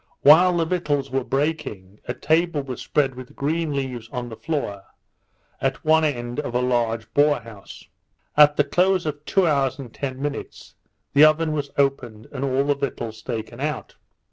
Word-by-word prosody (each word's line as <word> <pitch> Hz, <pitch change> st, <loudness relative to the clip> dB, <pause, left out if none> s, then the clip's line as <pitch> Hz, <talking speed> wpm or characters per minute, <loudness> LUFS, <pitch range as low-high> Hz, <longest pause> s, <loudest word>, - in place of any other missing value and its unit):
While 175 Hz, +5 st, +7 dB
the 165 Hz, -, +2 dB
victuals 145 Hz, -6 st, -1 dB
were 135 Hz, 0 st, 0 dB
baking, 135 Hz, -9 st, -3 dB
a -, -, -3 dB
table 160 Hz, -2 st, +1 dB
was 130 Hz, -2 st, -6 dB
spread 140 Hz, -3 st, +1 dB
with 130 Hz, +3 st, -11 dB
green 160 Hz, +2 st, -1 dB
leaves 130 Hz, -5 st, -4 dB
on 125 Hz, -2 st, -4 dB
the 110 Hz, -, -8 dB
floor, 140 Hz, -10 st, -3 dB, 0.8 s
at 135 Hz, +2 st, -2 dB
one 160 Hz, +1 st, +4 dB
end 120 Hz, -4 st, -2 dB
of 125 Hz, -5 st, -4 dB
a -, -, +3 dB
large 115 Hz, -3 st, -1 dB
boat 145 Hz, -4 st, +3 dB
house. 110 Hz, -3 st, -12 dB, 0.5 s
At 150 Hz, 0 st, +6 dB
the 145 Hz, -, +5 dB
close 185 Hz, +4 st, +2 dB
of 150 Hz, -1 st, -4 dB
two 195 Hz, -2 st, +2 dB
hours 140 Hz, -5 st, +1 dB
and 130 Hz, -5 st, -9 dB
ten 130 Hz, -2 st, -5 dB
minutes, 145 Hz, +1 st, -6 dB, 0.4 s
the 145 Hz, -, +7 dB
oven 155 Hz, +1 st, +3 dB
was 145 Hz, -2 st, -2 dB
opened, 130 Hz, -6 st, 0 dB
and 135 Hz, -, -5 dB
all 135 Hz, 0 st, +1 dB
the 145 Hz, +1 st, +2 dB
victuals 120 Hz, -5 st, -5 dB
taken 115 Hz, 0 st, -5 dB
out. 150 Hz, -1 st, -3 dB
140 Hz, 175 wpm, -23 LUFS, 125-150 Hz, 0.8 s, While